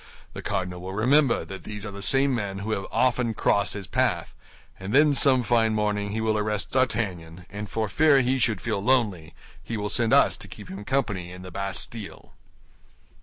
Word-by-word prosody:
The - - -7
cardinal 90 -1 -3
will 95 +1 -6
remember 130 +6 +3
that 95 -2 -9
these 105 0 -7
are 105 - -5
the 100 0 -9
same 135 +5 +3
men 100 -5 -3
who 100 +3 -4
have 100 -3 -2
often 125 -3 +1
crossed 100 0 +1
his 100 -2 -6
path; - - 0 0.5
and 95 +5 -3
then 150 +1 +5
some 135 -3 +4
fine 115 -1 +2
morning 105 -1 -1
he 110 +2 -3
will 110 -1 +1
arrest 105 -1 -2
D'Artagnan, 90 -10 -1
and 105 +1 -6
for 110 -1 -2
fear 145 +3 +4
he 130 +1 +1
should 110 -5 +1
feel 100 - -2
lonely, 105 -11 +1 0.3
he 115 - -5
will 105 0 -3
send 115 +1 +2
us - - +5
to - - -8
keep - - -11
him 100 +2 -8
company 105 -9 -1
in 90 0 -10
the 90 - -9
Bastille." 100 +3 -5
105 Hz, 195 wpm, -25 LUFS, 100-120 Hz, 0.5 s, then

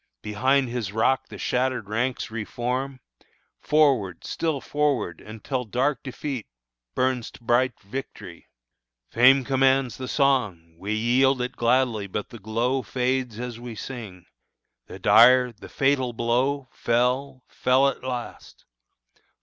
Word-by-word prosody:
Behind 130 +6 +1
his 120 -5 -4
rock 110 +5 +1
the - - -10
shattered 125 -3 -1
ranks 115 +2 -2
re 110 -1 -3
form; 130 +4 -3 0.6
Forward, 135 - +2
still 160 -4 -2
forward, 145 - -1
until 115 +4 -4
dark 125 +5 -1
defeat 130 -2 -5 0.5
Burns 130 -2 0
to - - -17
bright 120 +1 +1
victory! 100 -5 -8 0.6
Fame 130 +3 +5
commands 135 -1 +2
The 130 - -6
song; 110 - 0
we 100 +3 -3
yield 125 +4 +3
it 125 +1 -3
gladly; 120 -3 +1
but 105 +2 -5
the 115 - -11
glow 115 +6 -1
Fades 125 -3 -2
as 120 -1 -5
we 120 -1 -8
sing. 105 -8 -8 0.6
The - - -9
dire, 125 +2 +6
the 110 - -13
fatal 135 -3 +1
blow 125 +4 0
Fell, 125 +3 0
fell 130 +2 +2
at 135 - -3
last. 125 -2 -7
125 Hz, 130 wpm, -25 LUFS, 115-130 Hz, 0.6 s, dire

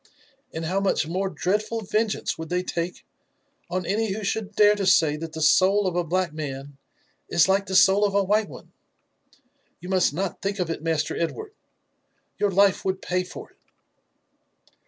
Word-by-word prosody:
And 160 0 -5
how 185 +4 0
much 195 -4 +1
more 185 +4 -2
dreadful 210 +5 -1
vengeance 215 +1 -1
would 160 0 -8
they 180 +1 -1
take 175 0 -4 0.6
on 185 0 -2
any 215 +3 0
who 215 +1 -5
should 210 0 -3
dare 210 0 +6
to 205 -2 -2
say 160 -5 +4
that 160 +1 -7
the 160 - -3
soul 195 +6 +4
of 180 -2 -1
a 175 - +1
black 175 0 -1
man 140 -2 -7 0.5
is 170 - +4
like 195 +1 +1
the 190 - -3
soul 195 +2 +5
of 200 -1 +1
a 200 - +3
white 210 +2 +1
one! - - -13 0.6
— - - -36
You 180 - -9
must 185 -6 +2
got 190 +1 -3
think 195 +2 -2
of 180 -3 -2
it, 165 - -5
Master 160 -1 -1
Edward, 425 - -4 0.4
— - - -47
your 205 - +2
life 195 0 +3
would 190 0 -1
pay 180 0 -1
for 180 0 -10
it." - - -33
185 Hz, 190 wpm, -24 LUFS, 170-200 Hz, 0.6 s, dare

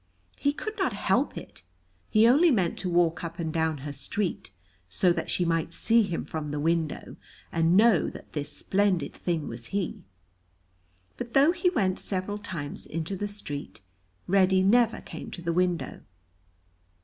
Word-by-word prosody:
He 285 - +2
could 430 +9 -6
not 380 - +1
help - - 0
it. - - -10 0.5
He 220 +1 +5
only 300 +8 +6
meant 190 - +1
to 185 - -1
walk 170 -1 +2
up 170 0 -5
and 160 -3 -3
down 160 -2 0
her 145 - -4
street, 170 - -3 0.4
so 180 - +3
that - - -4
she 180 - 0
might 165 0 -1
see 230 +1 +4
him 185 -6 -2
from 155 -2 -4
the 145 0 -3
window, 160 0 -1 0.3
and 165 +2 +3
know 220 -4 +5
that - - -12
this 150 -1 -2
splendid 190 +4 0
thing 165 -4 -2
was 115 0 -5
he; 195 -3 -3 1.2
but 240 -1 -6
though 280 +4 +6
he 360 +1 +1
went 195 - 0
several 200 +2 -1
times 165 -8 -5
into 165 +4 -3
the 205 +2 -3
street, 150 - -7 0.4
Reddy 190 0 +4
never 230 +3 +3
came - - -8
to 175 - -8
the 170 0 0
window. 180 -1 0
180 Hz, 165 wpm, -27 LUFS, 165-205 Hz, 1.2 s, only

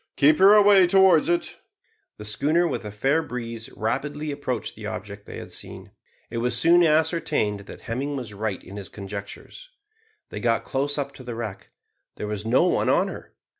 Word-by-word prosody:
Keep 150 +3 +4
her 195 +2 +8
away 200 -3 +6
towards 190 -3 +5
it." 175 0 -1 0.6
The 105 - -9
schooner, 155 +11 +2
with - - -3
a 105 - -5
fair 135 +10 +1
breeze, 115 -6 -6
rapidly 150 +7 -2
approached 130 -5 -4
the 105 -1 -7
object 105 -1 -7
they - - -8
had - - -9
seen. - - -9 0.4
It 115 - -3
was 120 0 0
soon 175 +4 +5
ascertained 155 - +1
that - - -10
Hemming 135 +5 -3
was 120 -6 -5
right 105 -1 -3
in 100 +3 -10
his 100 -4 -7
conjectures. 100 - -9 0.6
They - - -6
got 115 -1 +1
close 140 +2 -1
up 140 -1 -3
to 130 - -12
the 120 -2 -6
wreck. 110 -4 -6 0.5
There - - -5
was 105 0 -4
no 120 +3 +4
one - - +1
on - - +3
her! - - -10
125 Hz, 185 wpm, -24 LUFS, 105-155 Hz, 0.6 s, her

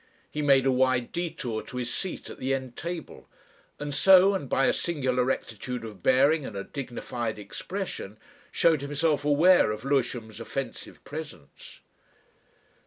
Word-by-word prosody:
He 150 - -3
made 135 -2 +4
a 135 - +4
wide 130 -1 +2
detour 145 -10 -3
to 125 - -9
his 120 -1 -2
seat 190 - -4
at - - -11
the 135 +1 0
end 130 -2 -6
table, 170 -2 -7 0.5
and 145 0 -5
so, 190 +4 +7
and 165 -9 -3
by 135 - +3
a - - +3
singular 130 -7 0
rectitude 125 -1 -3
of 105 -5 -10
bearing 140 - +4
and 110 - -7
a 100 - -3
dignified 120 -4 -5
expression, 105 - -6 0.3
showed 160 -4 +3
himself 145 +1 0
aware 155 +2 +5
of 105 +3 -4
Lewisham's 120 -5 -1
offensive 135 +4 -6
presence. 150 - -10
135 Hz, 150 wpm, -27 LUFS, 120-150 Hz, 0.5 s, so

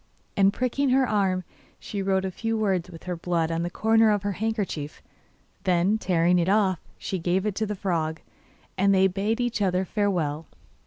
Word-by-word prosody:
And 195 0 +4
pricking 255 +5 0
her 260 0 +3
arm, 190 -4 +1 0.4
she 200 - -5
wrote 190 0 +1
a 190 - -2
few 225 +4 -2
words 190 -5 0
with 165 -2 -12
her 180 -1 -3
blood 170 -1 -1
on 165 0 -1
the 175 - -2
corner 225 +3 +3
of 205 -2 +1
her 205 - -1
handkerchief. 195 -8 -3 0.6
Then 185 +4 +2
tearing 175 -2 +2
it 170 +2 +1
off, 195 -4 +2 0.2
she 190 - -4
gave 180 +3 0
it 210 - 0
to 220 - 0
the 210 - -3
frog, 165 -5 -2 0.6
and 195 +1 +4
they 190 0 +5
bade 200 +5 0
each 240 -3 -1
other 185 -1 +1
farewell. 170 -8 -1
190 Hz, 190 wpm, -25 LUFS, 175-210 Hz, 0.6 s, they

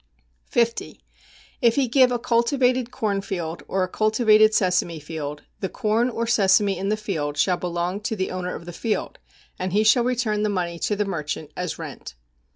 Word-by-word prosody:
50. 230 -1 0 0.6
If 235 -2 +4
he 275 -2 +2
give 255 +1 +4
a 245 - +1
cultivated 245 +1 +1
corn 215 -6 -1
field 175 -5 -4
or 190 -1 0
a - - -1
cultivated 215 +1 +4
sesame 180 -5 +1
field, 150 -1 -6 0.2
the 190 - -2
corn 230 +1 +1
or 230 -1 -2
sesame 200 -3 +3
in 190 +2 -3
the 215 - +1
field 155 -9 -3
shall 180 +5 +2
belong 175 +2 -2
to 220 +1 -2
the 190 -2 -2
owner 180 -1 -3
of 170 - -9
the 175 - -8
field, 215 +5 -3 0.4
and 185 0 -3
he 210 +2 +3
shall 220 +3 +5
return 235 -4 0
the 210 - +1
money 175 -4 -2
to 210 - 0
the 210 0 0
merchant 155 -4 -4
as 180 -2 -3
rent. - - -8
205 Hz, 185 wpm, -23 LUFS, 180-230 Hz, 0.6 s, shall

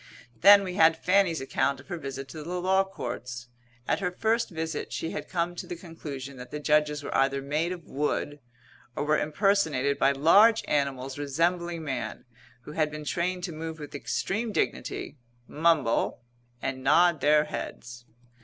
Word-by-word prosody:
Then 200 +2 +8
we 185 -2 -4
had 160 0 +5
Fanny's 180 -3 +2
account 140 +1 0
of - - -15
her 175 - -3
visit 135 -2 -6
to 155 +2 -8
the 175 +4 -4
Law 190 +2 +3
Courts. 125 -10 -6 0.4
At - - +1
her 185 -2 0
first 225 +5 0
visit 160 -2 -4
she 165 - -3
had - - -6
come 175 -1 -1
to 175 - -7
the 175 - -5
conclusion 145 -6 -8
that 125 0 -9
the 150 - -5
Judges 150 0 +1
were - - -4
either 135 0 +2
made 150 +5 -1
of 175 -3 -7
wood 145 +1 -2 0.6
or - - -1
were 155 0 +3
impersonated 155 -5 +1
by 135 - +4
large 200 +11 +5
animals 135 -1 -1
resembling 170 +4 -1
man 135 -5 -4 0.4
who 150 - -10
had 155 0 0
been 150 0 -7
trained 180 +3 -1
to 175 - -3
move 160 0 -6
with 150 -2 -9
extreme 215 +9 -2
dignity, 175 - -2 0.3
mumble 155 -7 +1 0.4
and 130 -1 -3
nod 165 +3 +4
their 150 +1 +5
heads. 120 -5 -7
155 Hz, 170 wpm, -27 LUFS, 140-175 Hz, 0.6 s, Then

